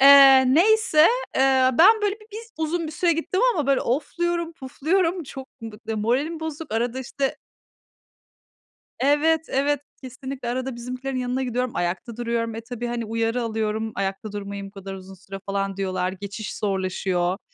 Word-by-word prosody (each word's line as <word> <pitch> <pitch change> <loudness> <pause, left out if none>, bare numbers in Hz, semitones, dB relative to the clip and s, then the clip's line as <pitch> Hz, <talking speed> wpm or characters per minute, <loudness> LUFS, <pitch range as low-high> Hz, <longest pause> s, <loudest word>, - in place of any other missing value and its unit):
Eee, 275 -1 +9
neyse, 435 -1 +4 0.4
eee, 265 -1 +4
ben 430 +6 +7
böyle 410 -1 +1
bi - - -15
bir - - -6
z 460 0 -10
uzun 320 +1 -1
bir 310 - -6
süre 340 +2 +2
gittim 330 +4 -1
ama 300 -5 -1
böyle 275 -1 +3
ofluyorum, 340 +6 -1
pufluyorum. 330 +5 0
Çok 270 -1 -9
bı 220 -2 -8
d 220 - -2
moralim 265 +10 0
bozuk. 320 -3 -5
Arada 240 +2 0
işte 270 +1 -2 1.6
Evet, 300 +4 +3
evet, 285 +1 +1 0.2
kesinlikle 260 0 -6
arada 255 +1 -2
bizimkilerin 255 +2 -5
yanına 250 +1 -1
gidiyorum, 250 0 -1
ayakta 185 +6 -2
duruyorum. 230 -1 -2
E, 225 - -4
tabii, 240 +1 -6
hani, 240 -1 -3
uyarı 230 +2 -1
alıyorum, 220 -1 -2
ayakta 195 +2 -3
durmayın 200 -1 -5
bu - - -11
kadar 195 -1 -8
uzun 190 0 -10
süre 195 +1 -9
falan 195 -1 -2
diyorlar. 185 -1 -1
Geçiş 200 +3 -6
zorlaşıyor, 185 -2 -1
250 Hz, 160 wpm, -24 LUFS, 215-295 Hz, 1.6 s, Eee